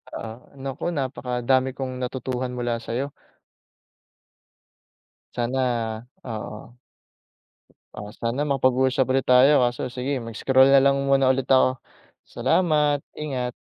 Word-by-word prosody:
Oo, 115 +1 -7 0.2
naku, 135 +3 -5
napakadami 130 -2 -1
kong 130 -1 -5
natutuhan 125 0 -3
mula 120 -1 -2
sa'yo. 125 +5 -4 2.2
Sana, 120 -2 -2 0.2
oo. 110 0 -8 1.2
Ah, 105 0 -8
sana 120 +5 -1
makapag-usap 130 -2 +2
ulit 130 0 +1
tayo, 130 +2 +6
kaso 120 +1 -1
sige, 130 +2 -3
mag-scroll 130 +3 +3
nalang 140 0 +3
muna 135 -1 +4
ulit 130 0 -2
ako. 130 -1 +3 0.5
Salamat, 150 -5 +1 0.2
ingat. 130 -5 -3
130 Hz, 100 wpm, -24 LUFS, 120-135 Hz, 2.2 s, tayo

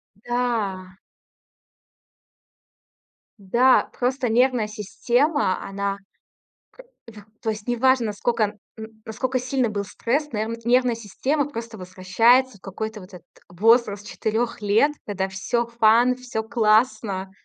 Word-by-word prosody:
Да. 205 -5 -3 2.4
Да 240 +7 +3
просто 255 0 0
нервная 245 -1 +2
система, 235 - 0
она 200 0 -3 0.8
к - - -15 0.2
да 215 -3 -13 0.2
то 225 - 0
есть 215 +1 -7
неважно, 245 -2 +2
сколько 225 +2 0 0.3
н 220 -1 -8 0.2
насколько 255 +4 -2
сильный 255 0 -1
был 205 -2 -3
стресс, 265 +9 -2
но 210 - -2
эрн 225 +2 -3
нервная 250 0 +3
система 270 +7 -2
просто 230 -4 -7
возвращается 200 +7 +2
в - - -38
какой-то 215 +3 -6
вот 185 +1 -14
этот 180 - -13 0.2
возраст 205 +2 +2
4 220 +2 -2
лет, 215 +8 +3
когда 195 -2 -2
всё 190 +5 -2
fun, 235 +3 +5
всё 245 -3 -4
классно. 215 -3 +1
225 Hz, 120 wpm, -23 LUFS, 205-245 Hz, 2.4 s, fun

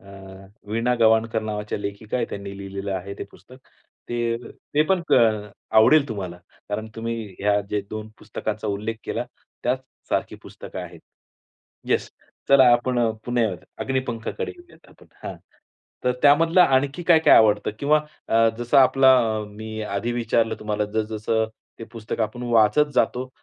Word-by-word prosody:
अ, - - -21 0.7
वीणा 115 +2 +1
गवाणकर 110 0 +3
नावाच्या 105 -1 -4
लेखिका 100 +3 -4
आहेत, 120 -2 -1
त्यांनी 100 0 -6
लिहिलेलं 100 0 -5
आहे 95 +2 -5
ते - - -4
पुस्तक. 130 +1 -17 0.5
ते 120 -1 -1 0.4
ते 150 - +5
पण 185 -2 +2
क - - +3 0.6
आवडेल 140 +6 +6
तुम्हाला, 95 -5 -5 0.3
कारण 105 +2 -3
तुम्ही 115 0 -3 0.2
ह्या 105 0 +2
जे 105 - 0
2 110 0 -6
पुस्तकांचा 110 0 -5
उल्लेख 105 +3 -3
केला, - - -3 0.4
त्याच 130 +2 0 0.3
सारखी - - -1
पुस्तकं - - -10
आहेत. 85 -2 -10 0.9
येस, - - 0 0.4
चला 140 -1 +7
आपण 120 +1 +1 0.3
पुन्हा 120 -1 +1
ये 95 -4 -2 0.3
अग्निपंखकडे 130 -4 -3
येऊयात 355 -1 -19
आपण. - - -20 0.2
हां. - - -5 0.7
तर 125 - +3
त्यामधलं 165 +5 +5
आणखी 140 +3 +1
काय-काय 165 -2 +6
आवडतं? 105 -2 +4
किंवा 150 +4 +3 0.3
अ, 115 0 +4
जसं 120 +2 +3
आपला, 135 0 +6 0.4
मी 110 +1 -7 0.2
आधी 115 +4 -2
विचारलं 115 -1 +1
तुम्हाला, 105 0 -1
जसं-जसं 110 +1 -1 0.3
ते 115 - -7
पुस्तक 115 -1 -5
आपण 110 +3 -2
वाचत 115 +6 +5
जातो, 130 +1 +1
115 Hz, 145 wpm, -23 LUFS, 105-125 Hz, 0.9 s, चला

